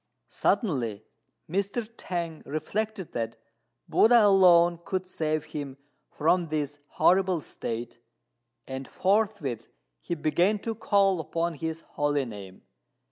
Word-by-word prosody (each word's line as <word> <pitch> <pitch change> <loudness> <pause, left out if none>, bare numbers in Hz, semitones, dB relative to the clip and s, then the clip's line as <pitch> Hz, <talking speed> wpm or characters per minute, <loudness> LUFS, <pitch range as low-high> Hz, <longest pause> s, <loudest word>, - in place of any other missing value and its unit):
Suddenly 120 - 0 0.4
Mr. 200 +6 -1
T'ang 170 -6 -4
reflected 190 +6 -3
that 115 -1 -3 0.5
Buddha 230 -1 +6
alone 175 -4 +6
could 185 -1 -2
save 155 -4 -1
him 140 -3 -6 0.3
from 170 +3 +1
this 145 -2 -3
horrible 185 0 +3
state, 120 -4 -6 0.7
and 130 0 -6
forthwith 190 - 0 0.3
he 170 - -3
began 170 +7 +2
to 225 +3 -4
call 200 -4 +2
upon 165 +1 -2
his 160 +1 -4
holy 145 -3 -1
name. 100 -5 -10
165 Hz, 110 wpm, -27 LUFS, 145-195 Hz, 0.7 s, Buddha